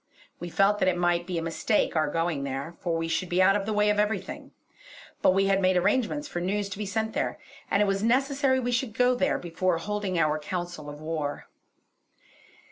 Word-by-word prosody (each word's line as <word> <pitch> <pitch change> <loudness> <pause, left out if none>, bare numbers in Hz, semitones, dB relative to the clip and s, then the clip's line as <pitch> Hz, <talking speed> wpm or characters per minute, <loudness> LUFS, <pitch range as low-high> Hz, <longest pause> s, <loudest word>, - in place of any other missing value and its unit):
We 175 - -6
felt 200 +4 +3
that - - +2
it 180 -1 +2
might 175 0 +1
be 180 -2 -2
a 165 - -2
mistake 165 +6 0
our 155 -2 +2
going 165 -2 -1
there, 140 +4 -4
for 170 -2 -1
we 165 0 -2
should 165 +2 -1
be 175 - +1
out 185 +1 +5
of 200 0 -1
the - - -1
way 210 0 +3
of 210 - 0
everything; 205 -3 -2 0.7
but - - +5
we 195 +1 +3
had 195 0 +2
made 185 -1 +3
arrangements 245 +9 +1
for 175 - -4
news 200 +2 -1
to 200 0 -7
be 210 - -3
sent 220 +2 -2
there, - - -1 0.3
and 200 - +3
it - - +2
was 195 0 0
necessary 265 +3 +2
we 245 -1 -1
should 235 -2 -1
go 250 +1 +4
there 275 +3 +1
before 175 +1 -1
holding 200 +1 -3
our 155 -1 +2
council 175 -1 -5
of 145 0 -9
war. 155 -2 -3
190 Hz, 215 wpm, -27 LUFS, 165-210 Hz, 0.7 s, out